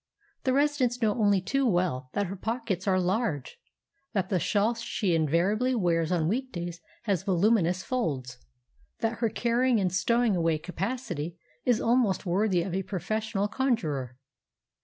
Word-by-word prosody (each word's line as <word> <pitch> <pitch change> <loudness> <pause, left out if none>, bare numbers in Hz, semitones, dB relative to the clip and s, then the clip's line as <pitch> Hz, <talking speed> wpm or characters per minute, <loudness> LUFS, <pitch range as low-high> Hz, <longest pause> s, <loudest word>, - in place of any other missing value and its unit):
The 260 - +3
residents 275 -4 +2
know 220 -4 +2
only 205 -3 +3
too 275 +9 0
well 175 - 0
that 205 - 0
her 195 +2 -5
pockets 210 -3 -3
are 185 -1 +3
large; 185 - -1 0.5
that 195 -3 0
the 185 - +1
shawl 210 +6 +2
she 225 -5 -1
invariably 180 - +2
wears 170 -5 +1
on 165 -3 +1
weekdays 175 -7 -3 0.2
has 200 -7 0
voluminous 185 -1 +2
folds; 140 - -2 0.6
that 225 0 -1
her 230 -2 +2
carrying 240 +2 +2
and 185 -3 0
stowing 235 +2 +2
away 165 -2 +2
capacity 175 - -4 0.3
is 245 -3 +3
almost 230 -4 +2
worthy 185 0 +2
of 180 -1 -4
a 190 - 0
professional 205 +2 -2
conjurer. 160 - -1
195 Hz, 145 wpm, -28 LUFS, 175-235 Hz, 0.6 s, The